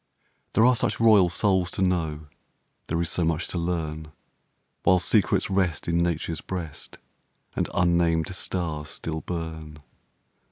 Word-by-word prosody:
There 110 - +5
are 125 0 +5
such - - 0
royal 105 -6 +6
souls 95 0 +1
to 95 - -1
know, 80 -5 -1 0.6
There 85 - -1
is 85 - -2
so 90 - 0
much 80 +1 0
to 90 - -3
learn, 80 -3 -3 0.7
While 95 - +4
secrets 90 - +2
rest 90 -5 0
in 85 0 +1
Nature's 85 -1 -1
breast 85 -6 -6 0.6
And - - -1
unnamed 85 0 +2
stars 80 -5 -3
still 80 -1 -4
burn. 80 -3 -6
85 Hz, 135 wpm, -25 LUFS, 80-90 Hz, 0.7 s, royal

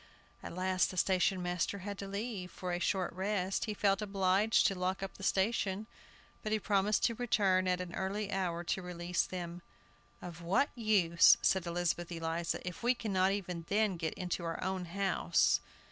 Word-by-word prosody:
At - - -8
last 185 0 +1
the 185 - -7
station 185 0 +2
master 180 +2 -1
had 200 -1 -5
to 195 - -5
leave, 200 -2 -4
for 180 -1 -5
a 175 - -1
short 185 -1 0
rest. 190 0 -1
He 215 -2 -3
felt 195 -1 +2
obliged 195 +1 +2
to - - +3
lock 185 +1 -2
up 195 - -5
the 195 - -12
station, 195 0 +1 0.6
but 215 - -4
he 220 - +3
promised 205 0 +1
to 230 - +3
return 200 -6 +2
at 180 0 +1
an 180 -1 -6
early 200 +2 -2
hour 175 -3 -1
to 185 +2 -1
release 180 0 -2
them. 175 -1 -5 0.6
"Of 170 -1 -9
what 185 +11 +2
use," 200 -8 +5
said 190 -2 +2
Elizabeth 175 0 -1
Eliza, 165 +1 -3
"if 180 - -6
we 245 +2 +3
cannot 195 -5 +1
even 180 -4 -4
then 210 -1 +2
get 160 -2 -3
into 180 -1 -3
our 165 -1 -3
own 190 -1 -2
house?" 195 +3 +2
185 Hz, 180 wpm, -33 LUFS, 175-200 Hz, 0.6 s, use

